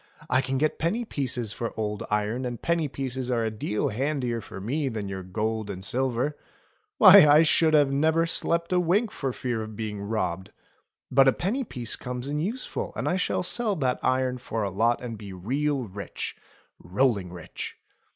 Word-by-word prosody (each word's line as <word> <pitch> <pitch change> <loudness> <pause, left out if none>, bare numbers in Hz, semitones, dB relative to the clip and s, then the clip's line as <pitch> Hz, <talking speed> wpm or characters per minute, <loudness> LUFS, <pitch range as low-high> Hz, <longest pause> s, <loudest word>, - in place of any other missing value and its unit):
I 130 +1 +4
can 135 0 -2
get 155 +3 0
penny 215 +9 0
pieces 125 - -2
for 115 0 -4
old 105 -1 -2
iron, 105 +4 0
and 120 -2 -4
penny 170 -2 0
pieces 130 -2 -4
are 120 -2 +1
a 110 - -1
deal 105 +5 -1
handier 125 -1 -1
for 95 - -9
me 135 +8 -1
than 110 -4 -4
your 95 -1 -5
gold 110 +3 -2
and 95 -1 -5
silver. 130 +4 0 0.6
Why! 190 -4 +10
I 150 +2 +7
should 160 0 +4 0.2
never 160 +3 +3
have 165 - -2
slept 170 +1 0
a 180 - +4
wink 195 +6 +2
for 135 -2 -3
fear 120 -2 -3
of 110 0 -7
being 105 -2 -4
robbed. 95 -4 -2 0.6
But 135 +1 +6
a - - +7
penny 225 +10 -1
piece 120 - -4
comes 125 +1 -5
in 145 +1 -1
useful, 225 +11 -3
and - - -2
I 180 - +1
shall 180 - 0
sell 215 +2 0
that 130 -6 0
iron 130 -1 +1
for 115 -3 -3
a 100 - -2
lot 115 +5 +2
and 115 -3 -6
be 100 -3 -8
real 135 +9 -1
rich 100 +1 -6 0.2
— - - -37
rolling 100 -1 0
rich." 90 -2 -7
125 Hz, 190 wpm, -26 LUFS, 110-150 Hz, 0.6 s, Why